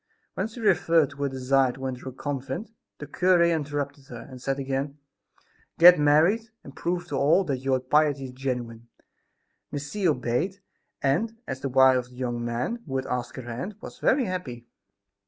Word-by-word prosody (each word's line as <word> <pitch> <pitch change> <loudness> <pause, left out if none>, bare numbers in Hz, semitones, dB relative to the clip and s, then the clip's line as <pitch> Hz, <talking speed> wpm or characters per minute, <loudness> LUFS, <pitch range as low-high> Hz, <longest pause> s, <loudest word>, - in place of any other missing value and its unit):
When 190 - -2
she 225 +2 -11
referred 165 -8 +3
to 140 - -14
her 140 0 -1
desire 130 0 +2
to 135 +1 -7
enter 130 0 -4
a - - -8
convent, 135 - -5 0.3
the 145 - -7
cure 180 +4 +3
interrupted 145 -4 -1
her, 120 -2 -9
and 130 -2 -11
said 135 +1 -1
again: 135 +1 -3 0.8
"Get 175 0 +9
married, 165 +10 +3
and 135 - -12
prove 175 0 -2
to 140 - -2
all 150 +8 +4
that 140 -7 -2
your 130 0 +1
piety 145 +1 +2
is 130 - -7
genuine." 125 -3 -4 0.8
Miss 145 0 -5
C. 205 -3 0
obeyed 145 +7 0 0.4
and, 215 +12 +1
as 130 - -4
the 135 - -3
wife 130 0 +6
of 125 0 -7
the 125 - -16
young 120 -2 -3
man 120 - -2
who 135 - -4
had 130 0 -1
asked 125 -1 -3
her 130 - -7
hand, 125 - -5
was - - -10
very 260 -1 +3
happy. 135 - -5
135 Hz, 185 wpm, -26 LUFS, 130-165 Hz, 0.8 s, Get